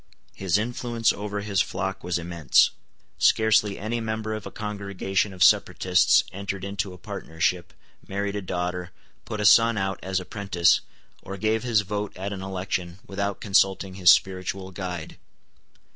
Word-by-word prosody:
His 95 -1 0
influence 120 +1 0
over 105 0 -4
his 100 -2 +1
flock 95 0 -3
was 90 0 -1
immense. 85 -4 +3 0.5
Scarcely 110 -2 +3
any 110 +3 -3
member 110 -1 -3
of 110 -2 -5
a - - -9
congregation 100 -1 -2
of 90 -2 +1
separatists 90 +1 +4
entered 100 0 -5
into 100 0 -3
a 90 - -11
partnership, 80 +1 -2 0.4
married 100 +1 -3
a 105 - -2
daughter, 90 -1 -3 0.4
put 110 - -5
a 105 - 0
son 115 +2 +6
out 95 0 -2
as 95 0 -1
apprentice, 90 -2 +1 0.4
or 100 +1 -7
gave 110 +3 0
his 120 -4 +2
vote 105 0 -4
at 100 +2 -4
an 95 - -6
election, 90 -2 -4
without 100 0 -3
consulting 95 -2 +2
his 90 -2 +4
spiritual 95 +1 +2
guide. 90 -3 -6
95 Hz, 150 wpm, -25 LUFS, 90-105 Hz, 0.5 s, son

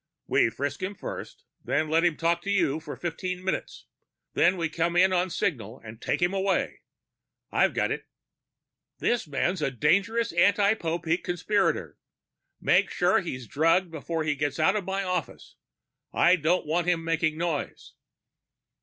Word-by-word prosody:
"We - - +3
frisk 140 +5 -4
him 190 +2 -3
first, - - -8 0.2
then 155 +2 0
let 160 +2 +2
him 170 -3 +2
talk 170 +1 +1
to 200 - -6
you 165 -7 +1
for 155 -2 -8
fifteen 180 +2 -4
minutes. 190 - -3 0.5
Then 185 +2 +3
we 165 -1 0
come 170 +2 -1
in 185 +2 +5
on 180 +1 +1
signal 120 - -2
and 110 +1 -10
take - - -1
him 175 +2 +2
away. 195 0 0 0.7
I've - - +2
got - - +1
it." - - -4 0.9
"This 240 -7 0
man's 155 +5 -1
a 150 - +1
dangerous 200 - +1
anti 200 +4 +4
Popeek 170 -3 -2
conspirator. 180 +4 0 0.6
Make - - +3
sure 180 +1 +2
he's 130 -9 -5
drugged 165 - +2
before 160 +1 -3
he 150 -1 +1
gets 145 0 -2
out 190 +6 +3
of 205 -3 -2
my 195 +1 -1
office. 185 -1 -4 0.6
I 175 +2 +5
don't 170 +2 +1
want 170 +3 0
him 170 -2 +1
making 160 -1 0
noise." 165 -3 -3
170 Hz, 160 wpm, -27 LUFS, 155-185 Hz, 0.9 s, in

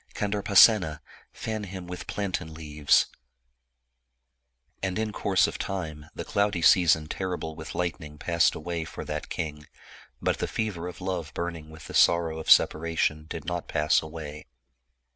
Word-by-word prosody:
Kandarpasena, 100 -4 +4 0.3
fan 110 -2 -4
him 95 -1 -7
with 90 0 -7
plantain 90 -6 -3
leaves! 75 -2 +2 1.0
" - - -49
And 95 0 -2
in 110 -1 -1
course 100 -3 +2
of - - -4
time 80 -6 -4
the - - -5
cloudy 100 -4 0
season 80 -4 +5
terrible 90 -3 -4
with 80 0 -8
lightning 80 -4 -3
passed 85 +2 +2
away 85 +1 -3
for 80 - -8
that - - -4
king, 75 -2 -5 0.5
but - - 0
the - - -1
fever 100 -6 -3
of 90 - -9
love 90 -4 -3
burning 85 -2 -4
with 80 -1 -12
the - - -9
sorrow 85 -2 +3
of 80 - -6
separation 80 -1 +3
did 80 - -6
not 85 0 -3
pass 75 -1 +2
away. 80 -1 -8
85 Hz, 150 wpm, -27 LUFS, 75-95 Hz, 1.0 s, season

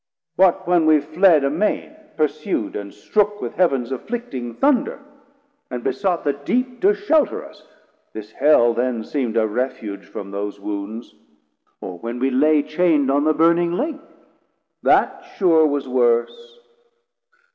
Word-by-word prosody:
What 185 -1 +3
when 175 -3 +3
we 155 -1 +5
fled 160 +1 +3
amain, 175 - -1 0.2
pursu'd 150 -7 -2
and 100 -1 -6
strook 210 - -1
With - - -5
Heav'ns 135 -9 +1
afflicting 130 - -5
Thunder, 275 -1 +1 0.7
and 125 -2 -5
besought 185 -4 -1
The 145 - +1
Deep 245 - -2
to 405 +2 +4
shelter 320 -8 +1
us? - - -17 0.4
this 110 0 -9
Hell 120 -3 +4
then 120 -1 -1
seem'd 120 -3 -3
A 110 - +3
refuge 110 -3 -4
from 100 -1 -8
those 100 0 -5
wounds: 105 +3 -6 0.7
or 90 -2 -7
when 115 +4 -5
we 135 +2 0
lay 150 +3 +3
Chain'd 155 -3 +1
on 145 +2 +1
the 155 - +3
burning 170 +1 +3
Lake? 295 - -3 0.8
that - - +2 0.2
sure 165 -5 +4
was 145 -2 -2
worse. 125 - 0
145 Hz, 140 wpm, -21 LUFS, 120-180 Hz, 0.8 s, we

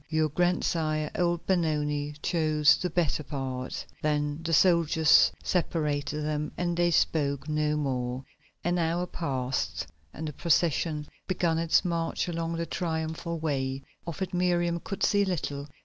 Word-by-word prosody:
Your 155 -1 +2
grandsire, 155 -2 0
old 175 -1 0
Benoni, 150 -5 0
chose 155 -3 +4
the 180 - -2
better 165 -2 0
part." 130 -3 -4 0.2
Then 150 0 0
the 165 0 -3
soldiers 165 -2 +5
separated 150 -4 -1
them 150 0 -2
and 175 -1 0
they 175 0 +3
spoke 145 -4 +1
no 150 0 +1
more. 130 -2 -2 0.4
An 175 +1 +1
hour 170 +2 0
passed 130 - -2 0.3
and 160 - -6
the 150 - -5
procession 160 -1 +1 0.2
began 170 -3 +1
its 165 +3 +3
march 170 -1 -1
along 165 -1 -2
the 170 - -1
Triumphal 165 0 -3
Way. 135 -4 -2 0.2
Of 170 +3 -3
it 185 - -5
Miriam 175 -1 +1
could 195 - -5
see 205 -1 +4
little. 145 -6 -3
160 Hz, 140 wpm, -28 LUFS, 150-170 Hz, 0.4 s, soldiers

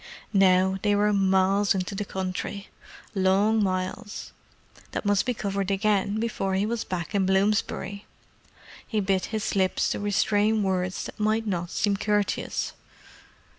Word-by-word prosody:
Now 190 -1 +4
they 205 -1 +2
were 210 +1 +3
miles 195 +1 +3
into 185 +1 -2
the 205 +1 -3
country—long 195 +2 -1
miles 185 +3 -3 0.6
that - - -3
must 205 +1 +2
be 250 - 0
covered 200 -2 -2
again 200 +1 +1
before 205 -4 -1
he 195 +2 +1
was 230 +1 -2
back 180 +1 -4
in 195 -2 +2
Bloomsbury. 200 0 0 0.8
He 215 - -1
bit 195 -2 +1
his 220 -1 -3
lips 190 -1 +1
to - - -2
restrain 205 +1 +2
words 185 -1 -1
that - - -9
might 215 +1 +1
not 175 -4 -2
seem 200 +1 0
courteous. 205 0 -1
200 Hz, 135 wpm, -26 LUFS, 190-210 Hz, 0.8 s, Now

